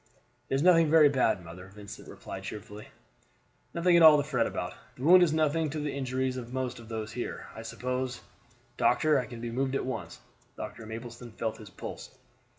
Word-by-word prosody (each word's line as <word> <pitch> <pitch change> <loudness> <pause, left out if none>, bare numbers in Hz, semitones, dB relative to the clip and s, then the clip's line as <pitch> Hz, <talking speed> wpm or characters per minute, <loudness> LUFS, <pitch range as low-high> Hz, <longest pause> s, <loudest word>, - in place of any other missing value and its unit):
"It - - +1
is 135 - +1
nothing 165 -3 +6
very 155 -2 +7
bad, 115 -9 +1
mother," 90 +3 -10
Vincent 100 +1 -11
replied 95 - -8
cheerfully; 105 +1 -8 0.8
"nothing 175 +1 +3
at 170 - +6
all 155 -2 +9
to 145 - +1
fret 125 -6 +1
about. 90 - -4 0.2
The 125 - -9
wound 180 +4 +8
is 175 -3 +4
nothing 155 0 +1
to 155 - -4
the 150 -1 -3
injuries 130 -1 -2
of 120 -1 -7
most 130 -1 -3
of 115 -1 -13
those 110 -1 -4
here. 120 +1 -5
I 110 - -7
suppose, 125 +2 -3 0.6
doctor, 150 +4 +3
I 125 - -4
can 120 -2 -9
be 120 -1 -4
moved 130 +2 -1
at - - -1
once?" 110 -10 -5 0.4
Doctor 115 - -7
Mapleston 120 +1 -8
felt 110 0 -3
his 105 -3 -11
pulse. - - -9
125 Hz, 195 wpm, -29 LUFS, 110-150 Hz, 0.8 s, all